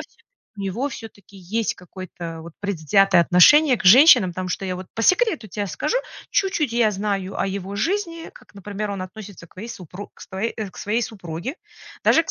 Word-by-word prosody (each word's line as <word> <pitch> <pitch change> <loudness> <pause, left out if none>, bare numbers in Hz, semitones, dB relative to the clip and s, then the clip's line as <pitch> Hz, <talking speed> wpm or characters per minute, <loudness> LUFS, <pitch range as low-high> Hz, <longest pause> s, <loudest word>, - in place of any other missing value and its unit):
всё-таки, - - -14 0.3
от - - -45
него 200 +8 -2
всё-таки 205 -6 -12
есть 200 +5 -2
какое-то 175 -2 -9
вот 170 - -11
предвзятое 195 0 +3
отношение 255 - +6
к 215 - -9
женщинам, 245 - +8
потому 185 +1 -5
что 195 - -3
я 185 -1 -2
вот 185 0 -8
по 225 - -3
секрету 370 - +2
те 205 +1 -4
скажу, 195 - -2 0.3
чуть-чуть 325 -10 0
я 235 -2 +3
знаю 195 -1 -3
о - - +1
его 195 +1 -5
жизни, 335 - -2
как, - - -19
например, 205 +1 -5
он 195 -2 -4
относится 195 -2 -10
к - - -28
вое 220 +5 -7
супруг 185 0 -9
к - - -21
свое 200 +4 -4
э, 215 -3 -4
к - - -20
своей 220 +4 -1
супруге, 190 - -6 0.5
даже 330 - +5
к - - -7
200 Hz, 195 wpm, -22 LUFS, 185-230 Hz, 0.5 s, женщинам